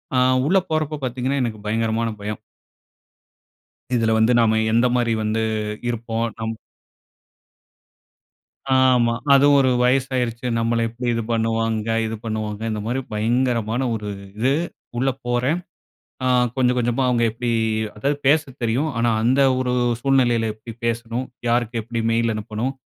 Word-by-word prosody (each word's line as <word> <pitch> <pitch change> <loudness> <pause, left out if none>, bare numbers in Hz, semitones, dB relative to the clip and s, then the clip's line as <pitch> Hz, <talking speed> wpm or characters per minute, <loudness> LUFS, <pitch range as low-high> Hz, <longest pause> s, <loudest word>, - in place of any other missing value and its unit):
அ, - - +3 0.3
உள்ள 195 +3 +4
போறப்போ 155 -1 -1
பாத்தீங்கன்னா, 130 +3 -1
எனக்கு 110 -3 -3
பயங்கரமான 115 +1 0
பயம். 105 0 -4 1.6
இதில 115 -1 +2
வந்து 110 +2 +4
நாம 110 -1 +3
எந்த 120 +2 +4
மாரி 120 -2 +1
வந்து 110 +1 0 0.5
இருப்போம்? 115 -1 -2
நம் 110 0 -2 2.2
ஆமா 125 -3 +4 0.2
அதுவும் 140 +1 +6
ஒரு 130 - +3
வயசு 130 +1 +2
ஆயிருச்சு 120 0 -2
நம்மள 115 0 +1
எப்படி 120 +2 -5
இது 115 - -1
பண்ணுவாங்க? 115 -1 0 0.2
இது 110 0 -3
பண்ணுவாங்க, 110 -1 -4
இந்த 105 - -3
மாரி 125 +3 -1
பயங்கரமான 115 +1 0
ஒரு 105 -2 -4 0.3
இது 130 +4 +2 0.4
உள்ள 135 +2 +2 0.2
போறேன். 125 +7 +1 0.7
ஆ - - +1 0.3
கொஞ்சம் 125 -1 +2
கொஞ்சமா 120 +2 0
அவங்க 120 -1 +2
எப்டி 120 +2 -3 0.5
அதாவது 140 +7 0
பேச 150 +3 +6 0.2
தெரியும். 125 +7 0
ஆனா 120 0 +2
அந்த 130 +4 +3 0.2
ஒரு 125 -1 0 0.3
சூழ்நிலையில 120 -4 +2
எப்டி 110 +2 -10
பேசணும்? 115 +2 -2 0.2
யாருக்கு 120 -1 0
எப்படி 115 +1 -4
மெயில் 115 0 +1
அனுப்பணும்? 110 +4 -3
115 Hz, 135 wpm, -22 LUFS, 115-125 Hz, 2.2 s, அதுவும்